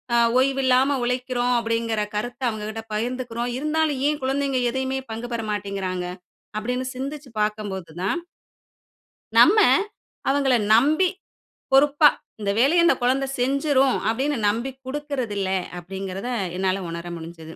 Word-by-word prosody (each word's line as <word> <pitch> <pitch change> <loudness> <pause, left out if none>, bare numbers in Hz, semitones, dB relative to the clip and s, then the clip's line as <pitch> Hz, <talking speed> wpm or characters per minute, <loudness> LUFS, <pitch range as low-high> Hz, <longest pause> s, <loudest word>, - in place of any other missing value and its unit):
அ - - +5 0.2
ஓய்வில்லாம 265 0 +3
உழைக்கிறோம் 250 0 0
அப்படிங்கிற 230 -1 -1
கருத்தை 245 +5 -4
அவங்ககிட்ட 215 0 -5
பகிர்ந்துக்கிறோம், 240 +1 -2
இருந்தாலும் 305 -1 0
ஏன் 300 -2 -2
குழந்தைங்க 270 0 0
எதையுமே 265 +1 -2
பங்கு 230 +2 -5
பெற 230 - -1
மாட்டேங்கிறாங்க? 195 -3 -3 0.5
அப்படின்னு 250 +4 -2
சிந்திச்சு 275 +1 -6
பாக்கம்போது 205 -5 -3
தான், 340 - 0 1.2
நம்ம, 435 - +7 0.7
அவங்கள 275 -2 +3 0.2
நம்பி, 305 +10 +4 0.6
பொறுப்பா, 290 +2 +6 0.3
"இந்த 200 - -1
வேலையை 315 +8 +5
அந்த 340 - +5
குழந்தை 265 +2 +2
செஞ்சிரும்." 270 +1 +2
அப்பிடீன்னு 265 +5 0
நம்பி 235 +6 -1
குடுக்கிறதில்லை, 255 -9 -2 0.2
அப்படிங்கிறத 195 +4 -6 0.3
என்னால 190 0 0
உணர 170 +1 -6
முடிஞ்சது. 165 -1 -9
250 Hz, 115 wpm, -23 LUFS, 210-270 Hz, 1.2 s, நம்ம